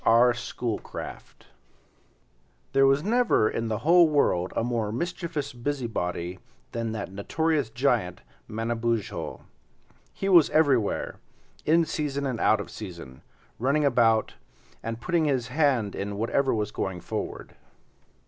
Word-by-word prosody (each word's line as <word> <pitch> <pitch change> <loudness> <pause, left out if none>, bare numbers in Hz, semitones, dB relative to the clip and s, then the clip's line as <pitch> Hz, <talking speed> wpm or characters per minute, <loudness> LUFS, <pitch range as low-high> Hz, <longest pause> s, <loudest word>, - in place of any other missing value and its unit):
R. 120 +2 +5
Schoolcraft 120 -1 -6 1.3
There 135 0 +5
was 135 +2 +3
never 230 - +3
in 115 +1 -2
the 110 -1 -1
whole 170 0 +6
world 95 -12 +2
a - - +1
more 115 -3 -1
mischievous 155 +1 -3
busybody 110 -9 -3 0.3
than 115 -1 -3
that 105 -4 -5
notorious 145 +7 0
giant 115 -7 0 0.3
Manabozho. 115 0 -2 0.7
He 195 - -4
was 175 -6 +6
everywhere, 135 -9 +2 0.5
in 165 +2 +4
season 140 -3 -2
and 125 -4 -2
out 110 - +4
of 100 - -6
season, 85 -11 -9 0.4
running 140 +5 +2
about, 115 -4 +3 0.5
and 115 0 -4
putting 170 +3 +1
his 130 -5 0
hand 130 -8 +1
in 100 +1 -4
whatever 130 +5 +1
was 105 -2 -1
going 95 -3 -3
forward. - - -5
120 Hz, 125 wpm, -26 LUFS, 110-145 Hz, 1.3 s, whole